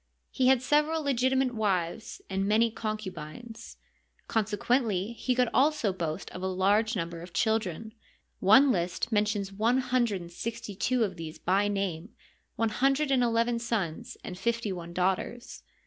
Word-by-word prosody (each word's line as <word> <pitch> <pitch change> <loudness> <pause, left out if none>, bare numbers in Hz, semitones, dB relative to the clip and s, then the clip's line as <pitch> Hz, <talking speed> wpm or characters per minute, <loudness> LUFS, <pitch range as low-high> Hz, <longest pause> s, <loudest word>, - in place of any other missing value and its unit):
He 255 - +2
had 260 -1 +4
several 300 +3 +2
legitimate 260 -1 +1
wives 195 -4 -2
and 195 0 -1
many 225 +2 +3
concubines. 215 +1 -6 0.5
Consequently 220 -1 0
he 250 +2 -1
could 250 -1 +3
also 270 -8 +2
boast 170 -1 -4
of 180 - -7
a 190 - -1
large 205 +5 +2
number 170 -2 -4
of 175 0 -11
children. 220 -2 -1 0.5
One 255 +8 +6
list 175 +3 -1
mentions 205 -2 0
one 225 +5 +2
hun 255 -1 +2
dred 200 -5 -3
and 170 0 -10
sixty 220 +2 -5
two 245 +5 +1
of 190 -4 -3
these 160 -1 -7
by 195 +3 +1
name— 195 -2 -3 0.4
one 225 -1 +1
hundred 275 +5 +1
and 260 -2 +3
eleven 235 0 +1
sons 230 0 -3
and 180 0 -7
fifty 230 0 -1
one 170 -2 -6
daughters. 190 +7 -2
220 Hz, 155 wpm, -29 LUFS, 185-245 Hz, 0.5 s, One